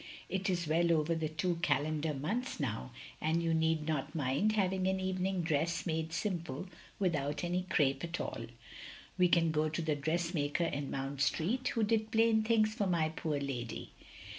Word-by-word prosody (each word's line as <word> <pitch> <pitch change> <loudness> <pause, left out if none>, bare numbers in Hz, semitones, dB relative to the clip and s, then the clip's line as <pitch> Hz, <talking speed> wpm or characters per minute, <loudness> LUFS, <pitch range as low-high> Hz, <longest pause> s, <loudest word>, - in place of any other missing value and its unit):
It 190 +1 -1
is 175 -3 0
well 170 +2 +3
over 155 +1 +2
the 160 -2 -1
two 165 +3 -1
calendar 155 -1 +1
months 210 - -2
now, 125 -3 -2 0.3
and 160 +2 +1
you 165 -1 +1
need 160 -1 +1
not 155 0 -2
mind 145 +9 +1
having 190 -2 +1
an 190 0 +1
evening 185 -1 -1
dress 160 +1 0
made 160 -1 -1
simple, 170 -5 -2 0.3
without 145 -6 0
any 180 +1 -1
crape 135 -4 +2
at 170 0 -3
all. 115 - -4 0.7
We 180 - +6
can 170 -2 +3
go 155 0 +1
to 160 - -2
the 155 -2 +1
dressmaker 160 +1 0
in 145 -3 -2
Mount 135 0 -3
Street, 230 - +1
who 225 - +1
did 220 0 +1
plain 225 0 +4
things 215 -1 +3
for 205 -3 0
my 165 -3 +2
poor 155 -2 -2
lady. 125 -5 -4
165 Hz, 175 wpm, -33 LUFS, 150-185 Hz, 0.7 s, We